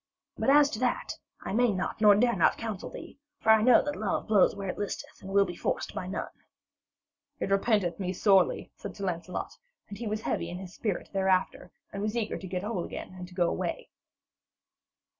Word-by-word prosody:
But - - 0
as 290 0 +6
to 215 - -4
that, 250 -1 0 0.3
I - - -5
may 240 +1 +3
not 185 +3 -3
nor 210 -2 +8
dare 235 +3 +3
not 170 - +3
counsel 220 -4 -5
thee. - - -10 0.2
For 220 - +4
I 220 -1 +6
know 245 +1 +6
that 295 0 -3
love 210 -2 -1
blows 210 -3 +4
where 200 -1 -5
it 185 - -4
listeth 205 - -5
and 190 - -9
will 200 0 +4
be 175 -2 -6
forced - - -2
by 180 - -4
none.' 190 - -3 1.1
'It - - -2
repenteth 195 -4 +2
me 185 -2 -1
sorely,' 190 -1 +3
said 200 - -8
Sir 200 - -4
Lancelot, 180 0 -4 0.3
and 200 0 -8
he 235 - -4
was 215 +1 -2
heavy 170 - -2
in 180 +2 -6
spirit 195 +1 -4
thereafter, 190 -2 +1 0.2
and 200 - -4
was 215 +3 -1
eager 220 -2 -2
to 190 - -8
get 180 0 -3
whole 210 -4 -2
again - - -7
and 180 -1 -8
to 180 - -15
go 175 -2 +2
away. - - -3
200 Hz, 205 wpm, -29 LUFS, 185-220 Hz, 1.1 s, nor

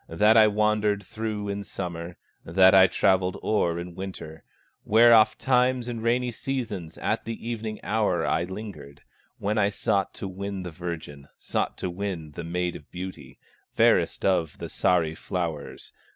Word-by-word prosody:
That 105 +7 +4
I 110 -1 +7
wandered 105 -1 +1
through 105 +1 -4
in 100 0 -3
summer, 85 -3 -6 0.3
That 95 +3 +5
I 95 -1 +8
travelled 95 0 +2
o'er 85 -6 +1
in 85 0 -6
winter, 85 -4 -8 0.4
Where 115 +2 +6
ofttimes 125 +3 +3
in 120 -2 -4
rainy 120 +2 +1
seasons, 110 -9 -4
At - - -1
the 115 0 -6
evening 110 -2 -4
hour 100 -4 +1
I 85 +2 +1
lingered, 95 -7 -9 0.3
When 105 +2 -1
I 100 -1 +3
sought 100 -1 -1
to 95 - -5
win 95 0 -5
the 90 - -6
virgin, 80 -4 -7
Sought - - -2
to 90 - -3
win 90 -5 -5
the 75 - -7
Maid 90 +1 -2
of 75 - -11
Beauty, 90 +1 -8 0.4
Fairest - - +3
of 85 -6 +1
the - - -6
Sahri 80 -3 +1
flowers. 85 -5 -5
95 Hz, 155 wpm, -26 LUFS, 85-110 Hz, 0.4 s, I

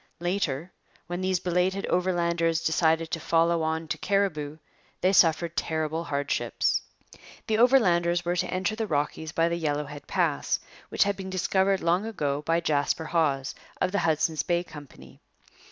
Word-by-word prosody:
Later, 175 -3 -2 0.3
when 175 +2 -4
these 185 -1 +1
belated 185 +2 0
Overlanders 170 -2 +1
decided 160 0 +1
to 165 - -1
follow 165 +1 +2
on 160 0 -2
to - - -3
Cariboo, 155 -7 0 0.4
they 185 +1 +3
suffered 170 -1 +3
terrible 160 0 -2
hardships. 140 -2 0 0.6
The 220 0 0
Overlanders 175 -9 +4
were 175 +1 0
to 175 - -1
enter 185 +3 -1
the 220 -1 -2
Rockies 155 0 -2
by 165 0 +2
the 170 0 -2
Yellowhead 145 -1 -3
Pass, - - 0 0.3
which - - +3
had 200 0 -1
been 190 -1 -7
discovered 190 +1 +1
long 175 +6 +1
ago 145 -10 -2
by 165 +2 +1
Jasper 155 0 0
Hawse, 145 -5 0 0.3
of 185 - +1
the 205 - +1
Hudson's 160 0 +1
Bay 175 -1 0
Company. 130 - -13
170 Hz, 155 wpm, -27 LUFS, 155-185 Hz, 0.6 s, Overlanders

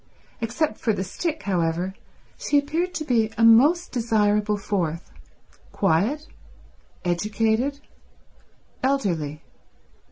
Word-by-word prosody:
Except 235 +2 -1
for 220 - +1
the 190 - -2
stick, 315 - -4
however, 175 -1 0 0.4
she 290 - +1
appeared 325 +6 -1
to 310 -1 -3
be 225 -5 +2
a 230 - +2
most 285 +11 +5
desirable 210 -3 +1
fourth—quiet, 195 - -2 0.8
educated, 220 +9 0 1.0
elderly. 175 - -1
220 Hz, 90 wpm, -24 LUFS, 190-280 Hz, 1.0 s, most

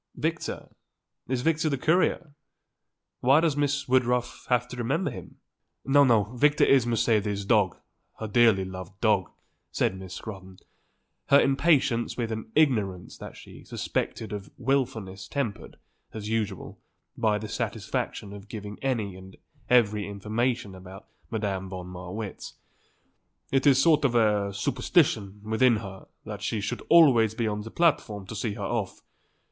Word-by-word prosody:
"Victor? - - -3 0.6
Is 125 -1 -1
Victor 160 0 +1
the 140 - -1
courier? 165 +1 +1 0.9
Why 135 +4 +5
does 160 -3 +1
Miss 145 -1 0
Woodruff 125 -1 0
have 125 -1 +2
to 125 - -7
remember 135 +6 -1
him?" - - -10 0.5
"No, 140 +1 +5
no. 115 -6 +4
Victor 145 +3 +3
is 130 -4 +4
Mercedes's 105 -3 +1
dog, 105 -5 +2 0.4
her 110 - -5
dearly 105 -3 +4
loved 95 +1 -9
dog," 105 -5 +2 0.4
said 95 - 0
Miss 95 -1 -8
Scrotton, 95 -3 -9 0.7
her 140 - +7
impatience 135 -4 +2
with 115 -2 -2
an 110 0 -5
ignorance 105 - +1
that - - -9
she - - -13
suspected 110 -2 -3
of 100 -1 -6
wilfulness 110 -8 -2
tempered, 115 -5 -4 0.4
as 105 -1 -5
usual, 110 -3 -3 0.4
by 110 -3 +1
the 110 +1 -6
satisfaction 100 -1 -3
of 100 0 -11
giving 105 -2 -7
any 115 -8 -1
and 95 0 -13 0.3
every 105 -5 +3
information 105 +2 -2
about 95 +2 -11 0.2
Madame 100 -4 -3
von 90 -1 -6
Marwitz. 90 +3 -7 1.0
"It 135 +1 +2
is 135 -2 +6
a - - +4
sort 155 0 +4
of 105 -5 +2
superstition 125 - +1
with 110 +3 -3
her 105 -6 +1 0.2
that 105 -2 -7
he 110 - -1
should 120 +4 -3
always 125 -10 +6
be 115 -1 -1
on 105 0 -2
the 110 - -8
platform 120 - +1
to 115 - -8
see 105 0 -2
her 100 - -6
off. 105 -2 -3
110 Hz, 145 wpm, -27 LUFS, 100-130 Hz, 1.0 s, her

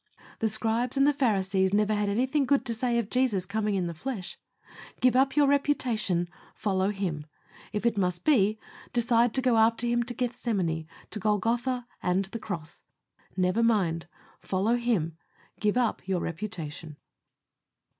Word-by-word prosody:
The 225 - +2
Scribes 225 +4 0
and 275 - +5
the 290 - +4
Pharisees 195 -7 +1
never 210 0 +2
had 205 -1 0
anything 260 +7 +1
good 275 -2 +2
to 235 - -1
say 235 +1 0
of 225 -3 -2
Jesus 245 -8 +1
coming 210 +1 -1
in 185 -2 0
the 170 - -3
flesh. 200 +1 -5 0.6
Give 255 0 +3
up 265 +1 +3
your 295 -1 +5
reputation 250 -11 +1 0.3
follow 190 -1 0
Him. 180 -7 -3 0.4
If 210 +1 -3
it 230 -3 +2
must 180 -2 -1
be, 215 -8 +4 0.4
decide 235 0 +3
to 260 - +1
go 250 -3 +3
after 225 +1 +3
Him 240 0 +2
to 240 +1 -4
Gethsemane, 215 -10 -1 0.2
to 210 - -4
Golgotha 235 +5 0 0.2
and 185 +2 +1
the 215 +4 -7
cross. 165 -7 -6 0.6
Never 185 +4 +2
mind 185 -8 +1 0.3
follow 195 +5 0
Him. 210 -10 0 0.4
Give 210 +2 +1
up 240 -3 +1
your 185 -2 0
reputation. 160 -4 -6
215 Hz, 155 wpm, -28 LUFS, 190-245 Hz, 0.6 s, and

